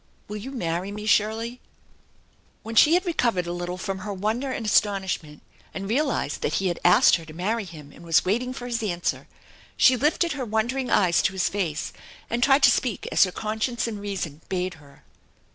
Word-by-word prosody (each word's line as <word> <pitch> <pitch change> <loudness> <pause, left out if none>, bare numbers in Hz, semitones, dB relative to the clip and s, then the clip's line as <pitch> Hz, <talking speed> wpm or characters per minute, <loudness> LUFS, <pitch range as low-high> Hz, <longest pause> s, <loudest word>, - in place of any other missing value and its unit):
Will 210 - -5
you 220 +6 -7
marry 180 -6 -3
me, 210 +1 -6
Shirley? 220 +3 +1 0.5
" - - -37
When 225 +1 -6
she 300 +8 +6
had 365 +2 +1
recovered 235 - +1
a 175 - -4
little 175 +1 -4
from 195 0 -4
her 205 +2 -5
wonder 220 +7 -2
and 235 - -4
astonishment, 190 -8 0 0.3
and 195 0 -4
realized 250 - -1
that 150 - -1
he 190 -1 +1
had 175 - -3
asked 185 +7 +6
her 165 - -11
to 155 0 -12
marry 205 +5 -1
him, 155 -5 -11
and - - -15
was 165 -2 +3
waiting 240 +7 0
for 250 -1 -7
his 240 -1 -2
answer, 175 -5 -2 0.5
sht 255 -1 +5
lifted 325 +3 +2
her 275 -2 -3
wondering 240 +4 -1
eyes 180 -4 +3
to 190 - 0
his 190 -2 0
face, 170 -7 -3 0.4
and 235 +1 0
tried 270 +2 +4
to - - +8
speak 240 -7 -1
as - - +5
her 185 - -5
conscience 220 +4 -2
and 215 -3 -5
reason 185 -7 -4
bade 185 -1 -2
her. 140 -1 -19
210 Hz, 200 wpm, -25 LUFS, 180-240 Hz, 0.5 s, to